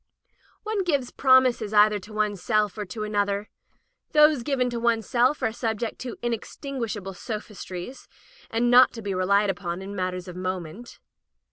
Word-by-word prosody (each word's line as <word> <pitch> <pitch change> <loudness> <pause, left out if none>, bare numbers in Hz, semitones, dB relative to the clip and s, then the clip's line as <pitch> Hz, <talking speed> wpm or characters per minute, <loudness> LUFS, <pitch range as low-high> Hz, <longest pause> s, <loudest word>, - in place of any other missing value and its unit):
One 430 -2 -1
gives 285 -8 0
promises 255 -5 +3
either 210 0 +5
to 205 +3 -13
one's 210 -3 -1
self 215 -3 +1
or 210 -1 -4
to 215 +3 -6
another. 205 -1 -1 0.6
Those 300 -3 +6
given 255 0 0
to 235 - -3
one's 230 -2 +1
self 255 +4 +2
are 220 - +2
sub 225 -1 -2
ject 230 +1 -4
to 250 -2 -6
inextinguishable 230 -3 -4
sophistries, 210 +1 -7 0.4
and 240 +2 +1
not 250 +1 +7
to 230 - -8
be 200 -1 -2
relied 200 +2 +2
upon 175 -2 -5
in 200 +1 -7
matters 185 -1 -3
of 180 - -8
moment. 185 +3 -5
215 Hz, 160 wpm, -25 LUFS, 200-245 Hz, 0.6 s, not